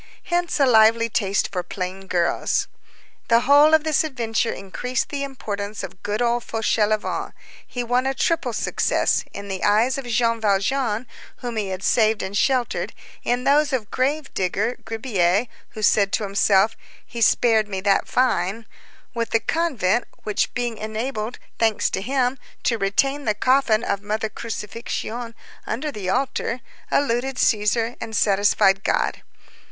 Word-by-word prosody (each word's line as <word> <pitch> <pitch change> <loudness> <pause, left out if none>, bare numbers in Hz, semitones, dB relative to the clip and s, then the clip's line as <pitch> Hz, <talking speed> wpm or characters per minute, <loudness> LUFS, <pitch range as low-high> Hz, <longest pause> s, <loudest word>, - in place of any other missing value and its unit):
Hence 350 -2 -1
a 275 - +5
lively 230 -1 +5
taste 200 -3 0
for 180 -2 -1
plain 185 +2 -6
girls. 175 -2 0 0.6
The 230 0 +4
whole 290 +4 +6
of 315 - +2
this 315 -1 +2
adventure 235 -6 -1
increased 245 +6 -3
the 285 -2 -3
importance 210 -7 -5
of 185 0 -8
good, 210 +3 -1
old 240 0 +1
Fauchelevent; 215 -1 0 0.3
he 245 -1 -4
won 245 +2 +1
a 270 - -1
triple 290 -3 0
success; 225 - +1
in 200 0 -8
the 190 -1 -4
eyes 225 +6 +3
of 260 - -7
Jean 230 -1 +1
Valjean, 215 +3 +1 0.4
whom 240 -2 -4
he 210 -2 -1
had 190 0 -5
saved 220 -2 +2
and 190 +1 -5
sheltered; 250 +1 0 0.3
in 245 +1 0
those 290 +2 +3
of 240 -6 -2
grave 280 +3 -1
digger 200 +6 -1
Gribier, 215 -3 +1 0.3
who 215 - -5
said 200 -1 +4
to 220 - +1
himself: 200 +2 +3 0.3
"He 235 - -7
spared 220 -2 +4
me 195 -2 -3
that 195 0 +2
fine"; 225 -3 0 0.5
with 230 -1 -2
the 225 - +2
convent, 240 - 0 0.2
which, 210 - 0
being 240 -3 -2
enabled, 220 +1 -4 0.2
thanks 225 -2 +2
to - - -2
him, 255 +3 0 0.2
to 230 -2 +1
retain 270 +9 +1
the 215 -2 +1
coffin 250 -1 +3
of 200 - -1
Mother 215 +1 -2
Crucifixion 230 +2 -5 0.3
under 280 +7 -2
the 200 -7 -5
altar, 250 +2 -1 0.3
eluded 265 -1 +1
Cæsar 225 +1 +1
and 225 -1 -5
satisfied 195 -1 +3
God. - - 0
225 Hz, 150 wpm, -22 LUFS, 205-250 Hz, 0.6 s, whole